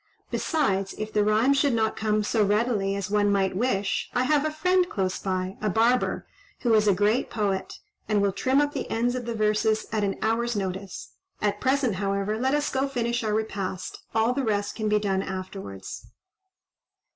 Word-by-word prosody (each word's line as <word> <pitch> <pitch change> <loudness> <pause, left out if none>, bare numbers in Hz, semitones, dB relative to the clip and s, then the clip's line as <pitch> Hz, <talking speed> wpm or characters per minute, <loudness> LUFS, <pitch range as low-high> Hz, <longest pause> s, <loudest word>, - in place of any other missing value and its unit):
Besides, 195 - 0
if 215 0 -5
the 210 - +3
rhymes 225 +7 +3
should 280 -3 +2
not 220 -1 +1
come 215 -1 0
so 215 +1 +2
readily 205 -1 +1
as 200 0 -4
one 205 -1 +3
might 195 -2 +1
wish, 200 -3 0
I 250 - +3
have 295 +2 +2
a - - +1
friend 360 +4 +2
close 190 -2 -1
by, 185 0 -2
a 215 - +1
barber, 230 +5 +2 0.4
who 240 -3 +2
is 215 -1 +4
a 200 - +5
great 210 +5 +1
poet, 200 -4 -2 0.3
and 210 -1 +3
will 200 0 +2
trim 260 +7 +1
up 290 0 +1
the - - -4
ends 240 +2 +1
of 250 -2 -4
the 235 - -2
verses 215 0 +1
at 215 -1 0
an 195 -1 -1
hour's 235 +1 +1
notice. 190 -1 -4 0.3
At 205 -1 -1
present, 260 -6 +1
however, 200 +2 -1
let 265 +3 +2
us 295 0 0
go 265 +1 0
finish 240 -3 -1
our 215 -1 0
repast; 195 -4 -3 0.2
all 225 +2 +3
the 275 +1 -1
rest 205 -3 0
can 215 -2 -2
be 210 - +3
done 195 -2 0
afterwards." 185 - -7
215 Hz, 190 wpm, -26 LUFS, 200-245 Hz, 0.4 s, a